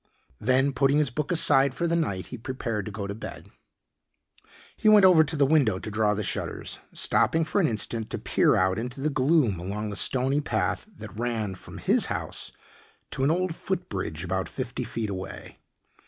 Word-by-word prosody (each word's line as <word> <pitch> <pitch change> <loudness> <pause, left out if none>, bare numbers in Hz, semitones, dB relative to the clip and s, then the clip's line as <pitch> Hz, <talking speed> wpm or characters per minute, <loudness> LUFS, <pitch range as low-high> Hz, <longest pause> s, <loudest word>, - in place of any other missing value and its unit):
Then 130 +4 +2
putting 135 +2 +3
his 150 -5 +2
book 150 +7 -3
aside 140 -5 +4
for 170 - -1
the 170 0 +1
night 100 - -1
he - - -4
prepared 115 -4 -4
to - - -5
go 100 0 -5
to 100 - -4
bed. 105 - -9 1.2
He 215 - +3
went 210 -2 +7
over 175 -4 +7
to 155 +1 -3
the 145 -2 +4
window 135 -9 +3
to 110 - -7
draw 105 0 +2
the 105 - -2
shutters, - - -4
stopping 165 0 +1
for 200 - +1
an 165 - +3
instant 110 -1 -3
to - - -3
peer - - +2
out 95 +2 +2
into 125 +3 -5
the 150 +3 0
gloom 135 - +2
along 105 +4 -4
the - - -5
stony 130 +7 +2
path 150 - -1
that 110 - -11
ran 115 -5 -2
from 90 - -11
his - - +2
house - - -4 0.6
to 130 - -2
an 140 - +3
old 180 +1 0
foot 185 +1 -4
bridge 85 -4 -4
about 95 +1 -2
fifty - - -4
feet 110 -3 -4
away. 95 0 -7
125 Hz, 195 wpm, -26 LUFS, 105-150 Hz, 1.2 s, went